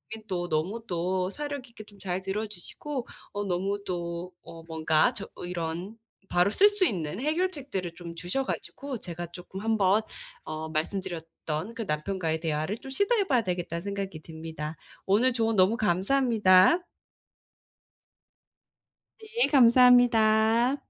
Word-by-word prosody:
인 220 - -12
또 180 -4 -2
너무 185 +9 -1
또 180 +1 -1
사려 290 +5 -4
깊게 235 -4 -13
좀 205 -1 -19
잘 185 -1 -3
들어 200 +3 -2
주시고 240 - -6 0.3
어 205 - -2
너무 195 +2 -1
또 175 0 -4
어 165 -1 -11
뭔가 160 +5 +2
저 205 -4 -6 0.2
이런 175 +4 -4 0.3
바로 180 +2 +3
쓸 405 - +6
수 410 -2 +1
있는 180 - -2
해결책들을 285 - -2
좀 170 -1 -8
주셔 180 +10 -2
가지고 270 -1 -5
제가 175 -2 -6
쪼끔 180 +2 -8
한번 210 -1 +3 0.4
어 155 0 -5
말씀 160 +5 -1
드렸던 165 +1 -5
그 230 - -4
'남편과의 160 -2 -1
대화를 155 +5 -2
좀 270 - -10
시도해 405 - +1
봐야 255 -5 +3
되겠다.'는 175 -3 -3
생각이 195 -5 -4
듭니다. 160 -1 -7 0.3
오늘 230 +7 +3
조언 225 -2 +1
너무 190 +4 +5
감사합니다. 210 - +4 2.4
네 455 +2 0
감사합니다. 240 -2 +5
195 Hz, 275 characters per minute, -28 LUFS, 170-235 Hz, 2.4 s, 쓸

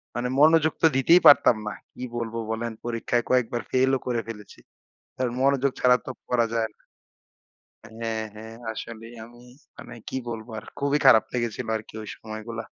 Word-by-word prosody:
মানে 120 +1 -1
মনোযোগ 155 +1 +5
তো 160 - +7
দিতেই 165 +7 +6
পারতাম 125 -5 +7
না। - - -2 0.2
কি 125 - -8
বলব, 115 -1 -4 0.2
বলেন? 115 +1 -3
পরীক্ষায় 120 0 -1
কয়েকবার 120 -1 +1
ফেইল 130 +1 +3
ও - - -13
করে 120 -2 0
ফেলেছি। 105 -3 -10 0.6
আর 130 - +1
মনোযোগ 140 0 +2
ছাড়া 125 0 +5
তো - - -6 0.2
পড়া 120 -2 +2
যায় 115 -1 +1
না। - - -33 1.1
হ্যাঁ, 110 0 -3
হ্যাঁ। 110 +1 -10 0.2
আসলেই 115 +1 -9
আমি, 120 +1 -16 0.4
মানে 120 - -10
কি - - -4
বলবো 115 0 -6
আর? 105 - -9
খুবই 140 +1 +1
খারাপ 110 -4 +7
লেগেছিলো 120 -2 -3
আরকি 110 0 -10
ওই 105 - -9
সময়গুলা। 110 +1 -7
120 Hz, 170 wpm, -25 LUFS, 110-130 Hz, 1.1 s, তো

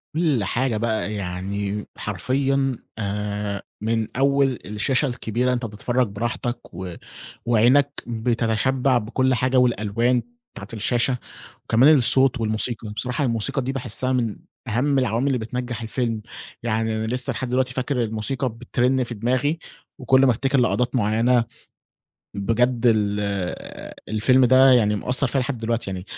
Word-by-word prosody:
كل 155 - +1
حاجة 120 +2 0
بقى، 110 -1 -1
يعني 100 +2 -3
حرفيًّا 135 +5 0 0.2
آآ، 105 0 -3 0.2
من 110 0 0
أول 135 -1 +2
الشاشة 115 +7 0
الكبيرة 125 0 -1
أنت 120 -1 -2
بتتفرج 120 +3 -1
براحتك 120 +4 -4
و 90 0 -6 0.5
وعينَك 125 +5 +3
بتتشبع 120 +3 +1
بكل 130 +4 0
حاجة، 130 +2 +1
والألوان 120 0 +2 0.3
بتاعة - - -9
الشاشة، 120 +3 0 0.5
وكمان 135 +7 +5
الصوت 130 0 +3
والموسيقى. 110 0 0
بصراحة 125 +6 -2
الموسيقى 115 +3 0
دي 130 +1 -2
باحسها 130 -1 -2
من 115 -4 0 0.3
أهَم 130 +5 +1
العوامل 125 +2 0
اللِّي 135 - +1
بتنَجّح 120 0 -4
الفيلم. 115 -1 -2 0.4
يعني 110 -1 0
أنا 110 - -2
لسّه 125 +3 +1
لحد 130 +2 -4
دلوقتي 130 +1 0
فاكر 130 -1 -1
الموسيقى 115 +4 -1
بترن 125 +3 0
في 120 0 -5
دماغي، 130 +8 0 0.4
وكل 130 +1 +4
ما 130 - +5
أفتكر 135 +3 +1
لقطات 125 +1 +1
مُعَيَّنة، 115 +2 +2 0.9
بجد 115 +4 +1
ال 105 -3 +2 0.9
الفيلم 125 +4 +4
ده 130 +2 +6
يعني 105 -4 +3
مأثَّر 125 +5 +1
فيَّ 135 +3 -1
لحد 130 -1 -2
دلوقتي. 115 -3 -2
يعني 90 -1 -5
120 Hz, 135 wpm, -23 LUFS, 110-130 Hz, 0.9 s, ده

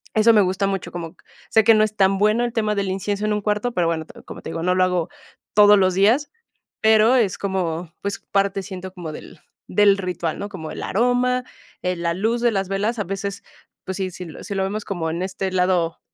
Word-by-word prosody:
Eso 220 +1 +5
me 210 - +6
gusta 190 +1 0
mucho, 195 -2 -3
como 170 -2 -6
q - - -27 0.3
sé 220 - +5
que 225 +1 +6
no 215 - +4
es 215 0 -2
tan 195 -1 +3
bueno 215 +4 +2
el 240 - -1
tema 215 -2 0
del 200 -1 -1
incienso 200 +2 -2
en 215 - +1
un 210 - -1
cuarto, 210 +4 -1
pero 175 -2 +1
bueno, 160 -2 -1 0.2
como - - -9
te - - -7
digo, 165 0 -4
no 180 0 +2
lo 185 - +3
hago 180 -2 0 0.4
todos 205 0 +7
los 185 -1 +3
días, 225 +10 +3 0.5
pero 220 +3 +5
es 215 -7 +2
como, 175 -4 -2
pues, 200 0 -3
parte 195 0 +1
siento 190 -1 -8
como 175 -4 -7
del 155 - -11 0.3
del 200 +1 +4
ritual, 175 -3 -3
¿no?, 205 - -5
como 160 -5 -7
el - - -7
aroma, 250 +3 +1 0.4
eh, 180 0 0
la 170 0 -1
luz 225 +5 0
de 240 -1 +3
las 195 -2 -2
velas, 210 +5 -1
a - - 0
veces, 195 +1 -4 0.4
pues, 190 - -4
si 190 -2 -2
si 180 +1 -8
lo 160 - -10
si 205 - -5
lo 190 - 0
vemos 205 +2 -3
como 170 -5 -3
en 170 +2 -3
este 190 0 -3
lado, 180 -2 +1
195 Hz, 235 wpm, -22 LUFS, 180-210 Hz, 0.5 s, todos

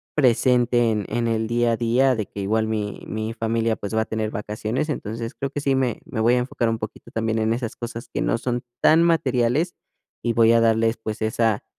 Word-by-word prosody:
presente 120 -3 +3
en 105 -1 -1
en 120 -1 0
el 110 -1 0
día 120 0 +2
a - - -1
día, 125 +3 +3
de 110 -3 -3
que - - -9
igual 110 +3 +1
mi 105 -2 -3
mi 110 +1 -3
familia, 115 0 0
pues, 100 0 -6
va 110 - +2
a - - -1
tener 110 -1 -2
vacaciones, 110 +6 -3
entonces, 115 -5 -4
creo 140 - -3
que 145 - -3
sí 140 -2 +1
me 130 +1 0
me 130 -9 -3
voy 120 +2 +4
a - - +2
enfocar 125 -1 0
un 115 0 -1
poquito 110 -1 -8
también 110 0 -1
en 110 0 +1
esas 115 -1 -4
cosas 120 +1 -6
que - - -1
no - - +1
son 120 0 -2 0.2
tan 160 +2 +6
materiales, 145 0 +1 0.5
y 120 - +1
voy 115 0 +5
a 115 - +4
darles, 115 0 +3
pues, 110 0 -6
esa 110 -1 +1
115 Hz, 225 wpm, -23 LUFS, 110-125 Hz, 0.5 s, tan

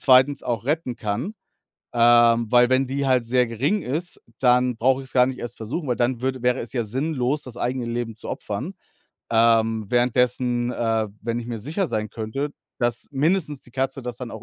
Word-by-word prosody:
2. 130 +1 +5
auch 115 -2 -2
retten 145 -3 -1
kann? 120 - -3 0.6
Ähm, 120 -1 +5
weil 120 +1 +5
wenn 130 0 +3
die 140 +1 -1
halt 125 -3 +2
sehr 125 +1 +3
gering 135 - 0
ist, 160 +5 -4 0.2
dann 125 -1 +3
brauche 130 +3 +2
ich 130 - -11
es - - -13
gar 125 -1 +6
nicht 130 0 -4
erst 120 - -6
versuchen, 130 +9 -4
weil 125 - 0
dann 120 0 0
würde 130 -1 -2
wäre 125 +1 +1
es 115 - -7
ja 120 -3 -1
sinnlos, 135 +3 -1
das 125 -2 -10
eigene 125 0 -2
Leben 115 -1 -3
zu - - -9
opfern. - - -4 0.6
Ähm, 115 -1 +3
währenddessen, 125 0 +1
äh, 115 -2 0
wenn 115 +1 -2
ich 120 - -6
mir 120 -2 -4
sicher 160 - -2
sein 110 -6 -3
könnte, 115 +6 -3 0.3
dass 120 -1 -1
mindestens 150 0 +1
die - - -14
Katze 135 +1 -2
das 120 -1 -5
dann 125 -2 -7
auch 110 - -8
125 Hz, 200 wpm, -23 LUFS, 115-130 Hz, 0.6 s, gar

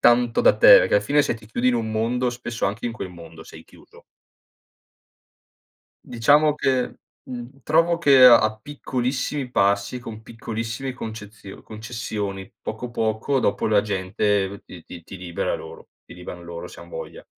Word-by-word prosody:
tanto 120 0 +4
da - - +5
te, - - +9
perché - - +1
alla 105 - +4
fine 145 +6 +3
se - - -1
ti 110 -2 -13
chiudi 120 +3 0
in 125 - +2
un 110 -2 -2
mondo, 120 +3 0
spesso 120 -2 -4
anche 100 +4 -4
in 115 - -3
quel 95 -4 -7
mondo 85 -2 -12
sei - - -13
chiuso. - - -19 2.0
Diciamo 145 +5 +3
che, 130 -4 -1 0.3
mhmm, 125 +2 -8
trovo 165 +2 +2
che 140 -6 +5
a 110 -3 +6
piccolissimi 135 0 -3
passi, 100 +2 +1
con 110 -2 -9
piccolissimi 115 +3 -5
concezio 105 -4 -9
concessioni 105 -3 -6
poco, 120 +3 -6
poco 115 +4 -1
dopo 100 - 0
la 105 -2 +4
gente 100 0 -1
ti 85 -3 -12
ti 85 -1 -11
ti 95 - -10
libera 90 -2 -3
loro, - - -10 0.2
ti - - -14
liberano 90 0 -9
loro 85 0 -7
se - - -12
han - - -13
voglia. - - -8
115 Hz, 160 wpm, -23 LUFS, 100-125 Hz, 2.0 s, te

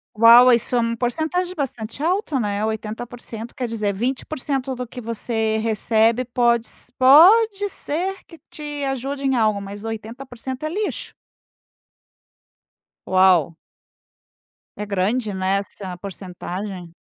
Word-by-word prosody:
Uau, 235 +3 +8
isso 235 +1 +1
é - - +3
um 230 0 0
porcentagem 320 +10 -2
bastante 255 -3 -4
alta, 340 -5 0
né. 205 -2 -1
80%, 225 +1 -5
quer 255 -4 -3
dizer 215 -3 -1
20% 265 +3 -3
do 250 0 -5
que 250 - -9
você 225 -1 -1
recebe, 225 +2 +2
pode 235 -1 +1
se 245 - -4
pode 395 - +6
ser 375 +1 -3
que 330 - -14
te 295 -1 -6
ajude 270 +1 -3
em 265 -1 +2
algo, 215 -3 +2
mas 200 +1 -8
80% 245 +4 -7
é - - -1
lixo. 410 +5 -4 1.9
Uau! 185 -4 +4 1.2
É 210 - -4
grande, 205 +3 -1
né? 190 +1 0
Essa 195 -2 -6
porcentagem. 185 -1 -7
235 Hz, 125 wpm, -21 LUFS, 210-270 Hz, 1.9 s, Uau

